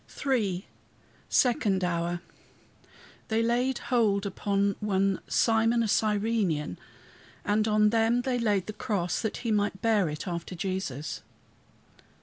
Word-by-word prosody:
III 205 -9 0 0.6
SECOND 210 -7 +2
HOUR 175 0 -1 1.1
"They 225 0 +1
laid 245 +2 +1 0.2
hold 205 -4 +3
upon 200 0 0
one 195 -2 +1
Simon 225 +1 +3
a - - 0
Cyrenian, 205 - 0 0.7
and 215 +1 +2
on 210 0 +4
him 230 +2 +2
they 250 -1 0
laid 205 -5 +1
the 215 - -6
cross, 185 -5 -1
that 220 - -2
he 230 - +1
might 205 -2 0
bear 215 -7 +3
it 150 +5 -6
after 170 +1 -4
Jesus." 170 -6 -4
205 Hz, 125 wpm, -28 LUFS, 185-225 Hz, 1.1 s, on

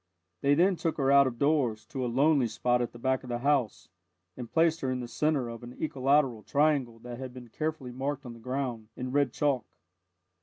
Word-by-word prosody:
They 140 +1 +4
then 180 +3 +3
took 165 -1 -2
her 135 -2 +2
out 140 -1 +7
of 120 -2 -4
doors, 135 -6 +1
to 130 - -4
a 125 - -1
lonely 140 0 +3
spot 120 +2 +1
at 120 - -2
the - - -12
back 130 +2 0
of 125 - -11
the 120 - -1
house, 135 -3 0 0.5
and 120 -2 -8
placed 165 0 +3
her 130 - -1
in 130 0 -1
the 120 - -5
centre 145 0 0
of 115 0 -7
an 120 +1 -10
equilateral 135 -5 +1
triangle 140 -4 +1
that 120 0 -8
had 130 -1 -7
been 125 -2 -10
carefully 155 -2 -3
marked 135 +2 -3
on 120 - -7
the 115 - -13
ground, 125 -3 -4
in 125 0 -4
red 140 -2 +2
chalk. 140 -3 0
130 Hz, 220 wpm, -29 LUFS, 120-145 Hz, 0.5 s, out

